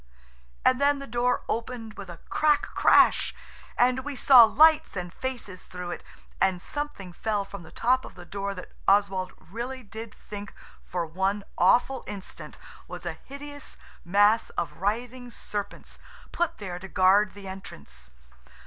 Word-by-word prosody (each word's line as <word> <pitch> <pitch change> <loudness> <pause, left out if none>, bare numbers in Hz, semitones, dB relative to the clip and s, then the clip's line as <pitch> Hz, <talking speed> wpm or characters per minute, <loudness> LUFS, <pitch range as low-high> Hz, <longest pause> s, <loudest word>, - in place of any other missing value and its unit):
And 255 +1 +4
then 285 0 +4
the 275 - -7
door 240 0 0
opened 230 -1 -4
with 200 -3 -9
a 170 - -8
crack 300 -1 +3
crash, - - +4 0.4
and 250 +1 +4
we 290 0 -5
saw 250 -2 +8
lights 310 +7 +5
and 180 -1 -5
faces 240 -8 -6
through 180 -1 -6
it, - - -6 0.4
and 190 -2 +3
something 290 -7 -5
fell 210 +1 -1
from 200 -1 -9
the 160 - -13
top 255 +2 +2
of - - -11
the 175 -1 -11
door 200 +2 -4
that 180 - -9 0.2
Oswald 195 -2 +3
really 240 +8 -6
did 220 +1 -8
think 205 -1 -9 0.3
for 175 -2 -3
one 190 +5 -1
awful 245 +8 +3
instant 200 -2 -8 0.3
was - - -8
a - - -2
hideous 285 +1 -10 0.3
mass 205 +5 +4
of 150 -2 -2
writhing 240 +6 -2
serpents 205 -3 -6 0.3
put 345 0 -1
there 180 -4 -6
to 190 - -8
guard 190 +2 +4
the 200 -1 -9
entrance. 70 - -10
205 Hz, 155 wpm, -27 LUFS, 190-250 Hz, 0.4 s, saw